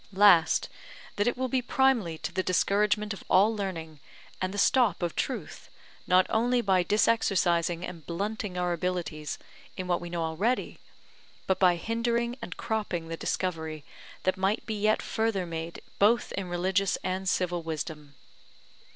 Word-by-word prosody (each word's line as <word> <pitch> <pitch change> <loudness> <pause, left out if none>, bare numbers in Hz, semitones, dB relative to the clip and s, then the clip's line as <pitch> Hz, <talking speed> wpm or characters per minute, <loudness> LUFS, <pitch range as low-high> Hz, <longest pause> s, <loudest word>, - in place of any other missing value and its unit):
Last, 190 -5 +5 0.5
that 205 +2 +1
it 245 - +1
will 260 0 0
be 255 0 0
primely 240 -10 +1
to - - -2
the 190 - 0
discouragement 205 +3 +1
of 195 - -10
all 205 +4 +5
learning, 165 -7 -5 0.4
and 185 0 -1
the 205 - -6
stop 235 -2 +3
of 170 - -2
truth, - - -4 0.4
not 185 0 +5
only 245 +3 +2
by 190 -5 +3
disexercising 180 -5 +2
and 170 -3 -9
blunting 200 +2 -3
our 180 -1 0
abilities 170 -4 -3 0.4
in 185 - -3
what 175 -1 0
we 175 - -6
know 170 -1 -2
already, 190 +11 -1 0.7
but 190 - +1
by 180 -2 +5
hindering 235 +5 -1
and 230 - -7
cropping 210 -8 -2
the 165 - -3
discovery 160 -4 -3 0.4
that 185 - +1
might 195 +3 0
be 220 - -3
yet 215 +1 +1
further 220 -4 -1
made 165 0 -6 0.2
both 220 +4 +3
in 190 -2 -4
religious 185 +2 +1
and 185 +1 -1
civil 180 -2 0
wisdom. 155 -2 -6
185 Hz, 155 wpm, -28 LUFS, 170-215 Hz, 0.7 s, Last